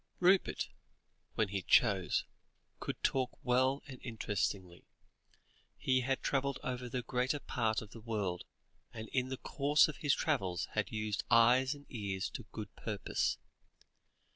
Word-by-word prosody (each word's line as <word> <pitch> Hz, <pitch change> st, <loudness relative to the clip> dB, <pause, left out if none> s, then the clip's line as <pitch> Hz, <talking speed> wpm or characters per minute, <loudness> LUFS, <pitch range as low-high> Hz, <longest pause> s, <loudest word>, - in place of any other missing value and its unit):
Rupert, 185 Hz, +1 st, +3 dB, 0.7 s
when 110 Hz, -3 st, +1 dB
he 100 Hz, -1 st, -2 dB
chose, -, -, +3 dB, 0.5 s
could -, -, -5 dB
talk 130 Hz, -2 st, +1 dB
well 130 Hz, +2 st, +2 dB
and 130 Hz, -3 st, -9 dB
interestingly; 100 Hz, -6 st, -3 dB, 0.9 s
he 130 Hz, -1 st, +2 dB
had 135 Hz, +2 st, -1 dB
travelled 140 Hz, -1 st, 0 dB
over 125 Hz, -1 st, -3 dB
the 125 Hz, +1 st, -2 dB
greater 125 Hz, +4 st, 0 dB
part 110 Hz, -5 st, 0 dB
of 105 Hz, -, -13 dB
the 115 Hz, -, -10 dB
world, 105 Hz, -6 st, -2 dB, 0.5 s
and 110 Hz, -2 st, -7 dB
in 130 Hz, -1 st, 0 dB
the 130 Hz, -, -3 dB
course 145 Hz, +3 st, +3 dB
of 155 Hz, -, -6 dB
his 145 Hz, -3 st, +2 dB
travels 90 Hz, -2 st, 0 dB
had 110 Hz, -3 st, -1 dB
used 110 Hz, -1 st, -2 dB
eyes 125 Hz, +4 st, +5 dB
and 145 Hz, 0 st, -14 dB
ears 100 Hz, -4 st, -3 dB
to 120 Hz, -, -7 dB
good 105 Hz, -3 st, -7 dB
purpose. 105 Hz, -4 st, -1 dB
120 Hz, 140 wpm, -34 LUFS, 105-130 Hz, 0.9 s, eyes